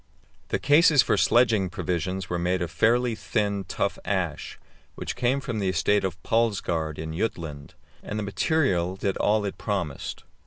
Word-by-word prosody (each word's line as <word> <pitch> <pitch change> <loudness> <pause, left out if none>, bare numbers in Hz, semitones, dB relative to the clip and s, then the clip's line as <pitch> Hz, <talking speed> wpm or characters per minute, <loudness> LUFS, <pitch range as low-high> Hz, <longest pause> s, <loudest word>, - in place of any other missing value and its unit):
The - - 0
cases 145 0 +5
for - - +2
sledging 115 -6 +3
provisions 90 +2 -3
were 90 -2 -2
made 90 +1 0
of 85 - -5
fairly 120 +4 +2
thin, 100 -2 -1
tough - - -2
ash, - - -2 0.4
which - - -5
came 125 +3 +1
from 120 -5 -4
the 95 -2 0
estate 100 +3 +2
of 90 -2 -3
Palsgaard 90 -9 0
in 80 0 -5
Jutland, 80 -8 -4 0.3
and 105 - -5
the 105 - -2
material 95 - +1
did 95 0 -2
all 105 0 +2
it 100 - -5
promised. 90 -9 -3
100 Hz, 160 wpm, -26 LUFS, 90-115 Hz, 0.4 s, cases